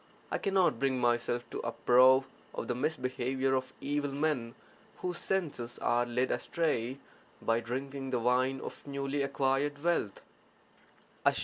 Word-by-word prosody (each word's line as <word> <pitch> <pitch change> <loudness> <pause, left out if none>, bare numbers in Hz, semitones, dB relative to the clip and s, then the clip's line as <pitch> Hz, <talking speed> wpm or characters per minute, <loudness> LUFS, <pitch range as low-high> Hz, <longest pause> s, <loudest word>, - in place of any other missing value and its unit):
I - - 0
cannot 190 -10 +2
bring 135 -2 +1
myself 120 0 +1
to - - -4
approve 130 +2 +5 0.3
of - - -4
the - - 0
misbehaviour 130 -1 -1
of 130 0 -1
evil 145 0 -1
men 140 -5 -1 0.4
whose 180 -1 -3
senses 145 -11 -2
are 120 0 +1
led 125 +2 0
astray 135 -7 -1 0.4
by 115 0 +1
drinking 135 +3 -4
the 130 - +1
wine 125 +3 +2
of - - -8
newly 140 0 -2
acquired 140 +1 0
wealth. 165 - 0
130 Hz, 130 wpm, -31 LUFS, 125-145 Hz, 0.4 s, approve